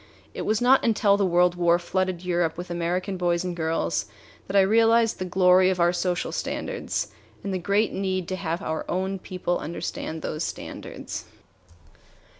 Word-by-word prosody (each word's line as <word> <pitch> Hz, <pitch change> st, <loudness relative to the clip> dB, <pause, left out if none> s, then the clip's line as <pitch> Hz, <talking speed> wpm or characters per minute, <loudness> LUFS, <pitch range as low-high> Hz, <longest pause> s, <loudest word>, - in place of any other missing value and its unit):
It -, -, -5 dB
was 215 Hz, 0 st, +2 dB
not 260 Hz, +2 st, +5 dB
until 210 Hz, -3 st, +3 dB
the 200 Hz, -1 st, +2 dB
World 175 Hz, 0 st, +4 dB
War 175 Hz, -1 st, +3 dB
flooded 185 Hz, 0 st, -2 dB
Europe 170 Hz, -2 st, 0 dB
with 175 Hz, 0 st, -6 dB
American 180 Hz, +3 st, -2 dB
boys 175 Hz, -1 st, +1 dB
and 180 Hz, -1 st, -3 dB
girls 165 Hz, -1 st, -1 dB, 0.4 s
that 190 Hz, -, -4 dB
I 200 Hz, -, +7 dB
realized 225 Hz, +3 st, +4 dB
the 185 Hz, -, -2 dB
glory 185 Hz, 0 st, +5 dB
of 185 Hz, -1 st, -1 dB
our 175 Hz, +1 st, +4 dB
social 180 Hz, 0 st, -1 dB
standards -, -, -3 dB, 0.3 s
and 195 Hz, -, -3 dB
the 185 Hz, -, -1 dB
great 200 Hz, +4 st, +1 dB
need 185 Hz, -2 st, -2 dB
to 185 Hz, -, -1 dB
have 175 Hz, 0 st, -3 dB
our 160 Hz, 0 st, -2 dB
own 190 Hz, +1 st, -1 dB
people 180 Hz, -1 st, -2 dB
understand 160 Hz, 0 st, -5 dB
those 155 Hz, +2 st, -3 dB
standards. -, -, -6 dB
180 Hz, 170 wpm, -25 LUFS, 175-195 Hz, 0.4 s, I